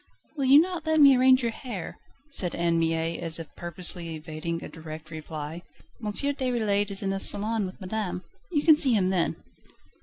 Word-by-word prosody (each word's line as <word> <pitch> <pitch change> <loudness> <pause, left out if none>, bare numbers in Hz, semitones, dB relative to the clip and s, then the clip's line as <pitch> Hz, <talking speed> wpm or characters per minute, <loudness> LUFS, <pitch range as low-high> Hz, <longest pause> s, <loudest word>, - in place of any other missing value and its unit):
"Will 275 -3 -1
you 275 +3 +8
not 340 -1 -1
let 315 0 +3
me 280 -2 +8
arrange 255 0 +5
your 235 - 0
hair?" 225 -6 -7 0.3
said 180 -10 +1
Anne 170 -1 +1
Mie 165 0 -1
as 165 -1 -1
if 165 -2 -10
purposely 175 -1 -3
evading 160 +1 -5
a - - -6
direct 155 0 -10
reply. 155 +1 -7 0.4
"M. 210 - -2
Déroulède 235 -6 0
is 200 0 -1
in 195 - -1
the 195 - -2
salon 210 +1 +2
with 185 - -11
madame. 190 -2 -4 0.3
You 295 -4 +1
can 315 - +7
see 275 -5 +4
him 190 -4 +2
then." 180 -3 0
195 Hz, 185 wpm, -26 LUFS, 165-255 Hz, 0.4 s, you